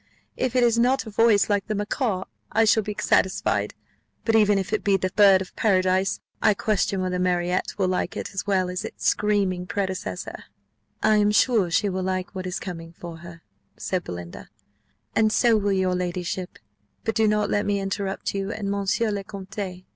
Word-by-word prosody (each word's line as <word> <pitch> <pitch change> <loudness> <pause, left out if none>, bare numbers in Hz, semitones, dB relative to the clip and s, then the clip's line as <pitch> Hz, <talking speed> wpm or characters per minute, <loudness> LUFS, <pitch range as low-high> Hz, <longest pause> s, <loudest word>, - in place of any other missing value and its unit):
If 255 -1 -2
it 250 - +4
has 235 -1 +3
not 250 +3 +2
a 220 - -8
voice 215 -1 +4
like 205 -1 0
the 215 - -1
macaw 205 -1 -1 0.3
I 225 +1 +3
shall 220 0 +4
be 210 0 -5
satisfied; 190 0 +1 0.5
but 225 - +2
even 210 -2 +5
if 195 +2 -3
it 215 - 0
be 200 -1 +3
the 185 0 -2
bird 195 -2 +6
of 185 - -17
paradise, 185 -2 +2 0.2
I 210 - +4
question 200 -2 0
whether 180 0 -1
Marriott 180 0 0
will 190 -2 +1
like 185 - -2
it - - -5
as 195 - -4
well 185 -2 +1
as 180 - -4
its - - -7
screaming 195 -4 +1
predecessor." 190 - -4 0.6
"I 215 0 +4
am 210 0 +3
sure 210 -2 +3
she 180 +5 +2
will 190 -1 -2
like 185 0 -2
what 185 -1 -5
is 180 - -3
coming 165 -3 -7
for 170 -1 -9
her," 170 0 -12 0.3
said 185 -2 -2
Belinda, 85 -1 -8 0.7
"and 215 -1 +3
so 235 +1 +4
will 205 -1 +1
your 190 -1 +1
ladyship; 180 0 -3 0.5
but 225 - -1
do 220 -1 +3
not 210 -1 +1
let 205 0 +1
me 200 -1 +1
interrupt 195 0 -3
you 195 0 -2
and 205 -3 -3
monsieur 200 +3 0
le 200 -1 -3
Comte." 195 -2 -7
195 Hz, 190 wpm, -24 LUFS, 185-210 Hz, 0.7 s, bird